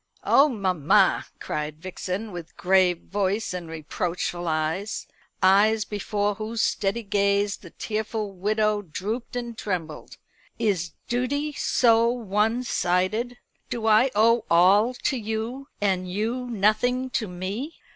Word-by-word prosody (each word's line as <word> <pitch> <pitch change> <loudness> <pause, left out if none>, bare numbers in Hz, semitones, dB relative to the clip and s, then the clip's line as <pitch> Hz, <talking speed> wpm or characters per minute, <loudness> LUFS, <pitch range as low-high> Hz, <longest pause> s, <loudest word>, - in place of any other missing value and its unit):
"Oh, 285 +2 +5
mamma!" 185 - +2
cried 150 0 -4
Vixen, 185 +4 -5
with 175 -3 -9
grave 180 -2 +3
voice 200 +1 -1
and 175 -2 -6
reproachful 175 +2 -3
eyes 160 +6 -1 0.4
eyes 210 +3 +5
before 205 0 -1
whose 220 +2 -2
steady 210 +4 0
gaze 200 0 +1
the - - -13
tearful 215 -1 -3
widow 210 +2 0
drooped 205 +8 -5
and 240 -1 -4
trembled, 175 -8 -5 0.4
"is 175 -6 0
duty 285 +5 -1
so 230 -4 +3
one 225 0 0
sided? 215 +4 0 0.3
Do 230 -2 -3
I 220 +4 +5
owe 230 +2 +4
all 195 +8 +5
to 265 - -1
you, 225 +4 -4
and 185 -3 0
you 230 +6 -2
nothing 245 +4 +1
to 225 -3 -1
me? 195 - -5
210 Hz, 125 wpm, -25 LUFS, 185-230 Hz, 0.4 s, Oh